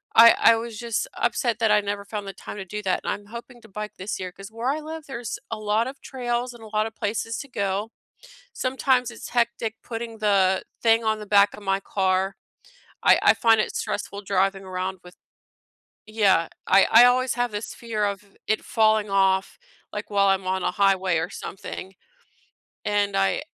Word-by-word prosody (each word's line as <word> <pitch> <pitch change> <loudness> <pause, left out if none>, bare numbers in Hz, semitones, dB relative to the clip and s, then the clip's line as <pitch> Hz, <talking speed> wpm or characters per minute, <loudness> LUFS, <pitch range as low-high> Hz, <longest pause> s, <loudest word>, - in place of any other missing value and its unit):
I 230 +1 +9
I 230 - +7
was 230 -1 -6
just 235 -3 -2
upset 235 -3 0
that 220 -2 +3
I 210 - +5
never 200 0 -3
found 205 -1 -5
the 195 - -6
time - - -9
to 195 - -6
do 210 +3 -5
that, 185 - 0
and - - -1
I'm 205 0 -9
hoping 235 +2 -10
to 225 - -16
bike 210 +2 -6
this 190 +2 -4
year, 185 -1 -5
'cause 195 +3 -12
where 230 +3 -4
I 295 - 0
live, 315 0 -8
there's 240 -5 -5
a 225 - -2
lot 215 +3 +1
of 270 - -9
trails 245 -1 -3
and 230 -2 -13
a - - -10
lot 215 +1 +2
of 225 - -11
places 225 +1 -2
to 280 - -7
go. 200 0 -2 0.6
Sometimes 255 -1 +1
it's 230 - -9
hectic 235 -2 0
putting 230 -1 -6
the 195 -3 +3 0.2
thing 225 0 +4
on 220 0 +1
the 210 - -8
back 200 0 +4
of 210 - -10
my 195 0 0
car. 190 0 0 0.7
I - - +6
I - - +6
find 225 -2 +4
it - - -2
stressful 200 0 -4
driving 195 0 0
around 185 0 -4
with 180 0 -14 0.9
Yeah, 200 -6 +2 0.2
I 195 - +6
I 235 +2 +9
always 255 0 +3
have 245 -2 0
this 205 +1 -5
fear 225 -3 -3
of 200 0 -5
it 215 - 0
falling 215 -2 +2
off, 195 -1 +2 0.4
like, - - -5
while 200 -1 +3
I'm 195 -1 +2
on 190 0 0
a - - +1
highway 190 -3 +2
or 165 - -3
something, 190 0 -8 0.9
and 205 -1 +1
I 195 +7 +1
210 Hz, 200 wpm, -24 LUFS, 195-230 Hz, 0.9 s, I